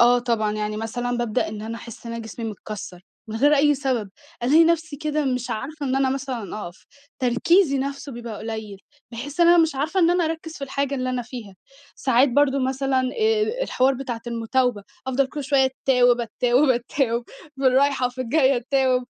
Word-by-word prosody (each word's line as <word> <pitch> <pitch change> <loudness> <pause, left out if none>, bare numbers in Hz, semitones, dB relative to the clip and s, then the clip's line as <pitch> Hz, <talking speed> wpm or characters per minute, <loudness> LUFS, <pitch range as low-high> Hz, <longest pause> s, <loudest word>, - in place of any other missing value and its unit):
آه 240 +1 +6
طبعًا، 230 -3 0
يعني 210 0 -3
مثلًا 245 +3 -3
بابدأ 235 -3 0
إن 215 0 -6
أنا 225 +1 -5
أحس 230 0 -11
إن 230 - -5
أنا 230 0 -5
جسمي 225 +1 -7
متكسّر 200 -3 -8 0.3
من 220 - -4
غير 290 +6 +4
أي 295 +1 +4
سبب، 255 -7 -2 0.3
ألاقي 305 +7 +6
نفسي 320 -3 0
كده 305 0 -1
مش 250 -2 -2
عارفة 280 +6 -4
إن 265 0 0
أنا 270 -1 +2
مثلًا 260 -7 -4
أقف، 175 +1 -13 0.3
تركيزي 275 +5 +3
نفسه 275 +1 -4
بيبقى 235 -3 -7
قليّل، 220 -3 -6 0.3
باحس 275 +7 -6
إن 340 - +6
أنا 345 0 +7
مش 320 -3 +3
عارفة 305 +8 0
إن 340 0 +5
أنا 350 -1 +2
أركز 320 0 -4
في 280 - -4
الحاجة 275 +1 -2
اللي 255 -1 -2
أنا 250 -1 -2
فيها. 230 -5 -9 0.4
ساعات 260 +1 +3
برضو 275 +1 +3
مثلًا 265 0 0 0.2
آآ، 440 +2 +1
الحوار 265 - +2
بتاعة 250 -3 -5
المتاوبة، 235 -1 0 0.2
أفضل 265 +1 +1
كل 290 +1 -6
شوية 275 0 +3
اتتاوب، 250 -2 +2
اتتاوب، 245 +4 +2
اتتاوب 240 -1 0 0.3
في 270 - 0
الرايحة 265 0 +3
وفي 250 +1 -7
الجاية 265 +1 +3
اتتاوب، 255 0 +1
260 Hz, 190 wpm, -23 LUFS, 235-280 Hz, 0.4 s, أنا